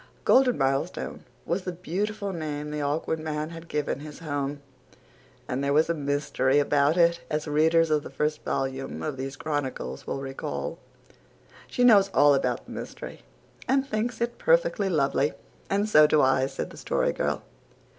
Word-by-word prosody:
Golden 255 -2 +5
Milestone 135 +5 -1 0.2
was 175 +3 -1
the 180 - -4
beautiful 200 +4 -3
name 150 -3 -4
the 150 0 -3
Awkward 150 +2 -1
Man 155 0 -3
had 165 0 -9
given 150 -3 -2
his 150 0 -9
home; 145 -2 -3 0.9
and 130 +2 -2
there 140 0 +1
was 155 +3 +3
a - - +1
mystery 145 -2 0
about 145 +2 +3
it, 170 0 +4
as 155 0 -2
readers 160 +2 +3
of 150 -1 +3
the - - -9
first 150 0 -1
volume 135 0 -3
of 150 -3 -2
these 135 +1 -5
chronicles 135 - -4
will - - -2
recall. 135 - -5 0.9
"She 250 - 0
knows 205 -5 +6
all 145 0 +6
about 135 - 0
the - - -12
mystery - - -8 0.5
and 270 0 +2
thinks 225 0 -2
it 235 0 -2
perfectly 485 - +2
lovely 145 -3 +1 0.4
and 200 +2 +1
so 155 -7 +7
do 155 - +3
I," 130 -1 +3
said - - -5
the - - -12
Story - - 0
Girl. - - -2
150 Hz, 165 wpm, -26 LUFS, 140-180 Hz, 0.9 s, so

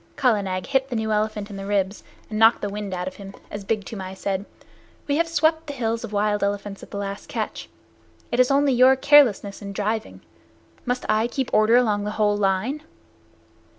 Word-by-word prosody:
Kala 240 -6 +2
Nag 185 -1 -3
hit 270 -1 0
the 245 - -3
new 220 -1 -1
elephant 210 -1 -1
in 200 - -7
the 195 - -6
ribs 200 -1 -1 0.2
and 215 -1 -4
knocked 225 +1 +5
the 205 - -2
wind 205 -1 -5
out 180 0 -3
of 185 - -7
him, 195 -1 -10 0.2
as 205 -1 -6
Big 210 0 -2
Toomai 190 -3 -7
said, 195 0 -3 0.6
"We 285 0 +1
have 335 +1 +2
swept 320 0 +1
the 290 - -4
hills 230 -3 -2
of 230 - -6
wild 210 0 0
elephants 200 0 -3
at - - -12
the - - -6
last 200 0 -5
catch. - - -4 0.6
It 240 - 0
is 255 - +5
only 280 0 +3
your 255 +2 +6
carelessness 255 -9 +4
in 200 -1 -6
driving. 215 +2 -3 0.7
Must 250 0 -1
I 215 +2 +2
keep 260 +1 -3
order 215 +2 +5
along 210 -4 +1
the - - -2
whole 210 -1 +3
line?" 205 +8 0
215 Hz, 205 wpm, -23 LUFS, 200-250 Hz, 0.7 s, your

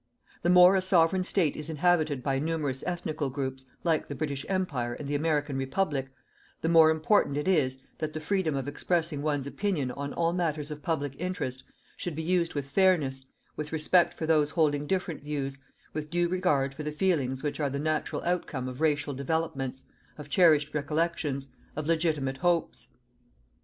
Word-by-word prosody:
The 175 - +1
more 180 +1 +8
a 190 - +3
Sovereign 185 0 +3
State 180 -5 +1
is 155 +1 -6
inhabited 155 -4 +1
by 135 -1 0
numerous 150 -4 -2
ethnical 155 -5 -2
groups, 130 -1 -4 0.2
like 165 -3 +1
the 145 - -5
British 140 -1 -3
Empire 140 -11 -1
and 145 - -7
the 145 - -2
American 145 -2 0
Republic, 135 0 -1 0.5
the 165 - 0
more 165 -1 +7
important 160 -1 +2
it 150 - -2
is 140 -8 +2 0.2
that 155 -1 -3
the 155 - -3
freedom 160 -2 0
of 135 0 -3
expressing 160 0 -1
one's 145 -2 -1
opinion 150 -4 -1
on 140 +2 -5
all 170 0 0
matters 155 -4 -1
of 150 0 -6
public 145 -5 -1
interest 165 -8 -3 0.3
should 175 -4 -4
be 160 - -3
used 175 -1 +1
with 145 -2 -2
fairness, 140 -4 +2 0.3
with 150 0 -5
respect 160 +3 +3
for 160 - -3
those 155 -2 +3
holding 150 -3 +1
different 180 -3 -2
views, 140 -2 -4 0.3
with 155 0 -4
due 175 +1 +1
regard 160 -7 +1
for 145 - -7
the 150 0 -3
feelings 150 -6 0
which 150 0 -2
are 145 -2 +1
the 140 - -3
natural 155 +1 -1
outcome 165 -7 -2
of 130 +3 -7
racial 145 -2 +1
developments, 135 -2 -2 0.3
of 150 -1 -9
cherished 150 -4 +4
recollections, 150 -2 -1 0.3
of 155 0 -3
legitimate 155 -5 0
hopes. 165 - 0
150 Hz, 175 wpm, -28 LUFS, 140-170 Hz, 0.5 s, more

